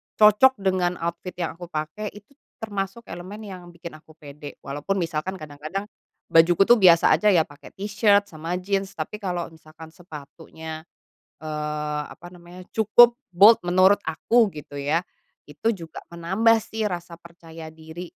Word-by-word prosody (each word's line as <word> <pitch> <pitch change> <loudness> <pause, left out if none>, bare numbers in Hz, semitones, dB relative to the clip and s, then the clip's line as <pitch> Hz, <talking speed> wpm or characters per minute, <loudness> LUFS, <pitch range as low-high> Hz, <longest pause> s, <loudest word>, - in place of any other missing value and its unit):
cocok 215 +5 +6
dengan 185 -2 +1
outfit 170 +2 -4
yang 170 -2 -4
aku 175 - -9
pakai, 160 +6 -5
itu 210 +5 -16 0.3
termasuk 205 +1 -4
elemen 190 +5 -8
yang 190 -3 -9
bikin 170 0 -9
aku 155 0 -20
pede. 145 -1 -11
Walaupun 145 +7 -3
misalkan 165 +2 -3
kadang-kadang 155 +3 -6 0.5
bajuku 170 +3 +5
tuh 235 +2 +5
biasa 170 -3 +6
aja 210 - 0
ya, 165 -3 +4
pakai 145 +2 -16
t-shirts 205 0 +2
sama 165 +2 -4
jeans, 195 +1 -2
tapi 165 +7 -5
kalau 180 -4 -3
misalkan 160 0 -14
sepatunya, 160 -1 -10 0.6
eee, 150 -1 -3
apa 175 - -13
namanya, 175 +1 -13
cukup 235 +2 +5 0.2
bold, 210 +5 +8
menurut 185 +3 +5
aku, 220 +8 +2
gitu 145 -1 -9
ya, 155 +5 0 0.5
itu 150 +10 -2
juga 165 -4 -10 0.2
menambah 190 +7 +3
sih 220 0 -3
rasa 175 -3 -6
percaya 165 -2 -12
diri. 160 +2 -9
175 Hz, 150 wpm, -24 LUFS, 160-195 Hz, 0.6 s, bold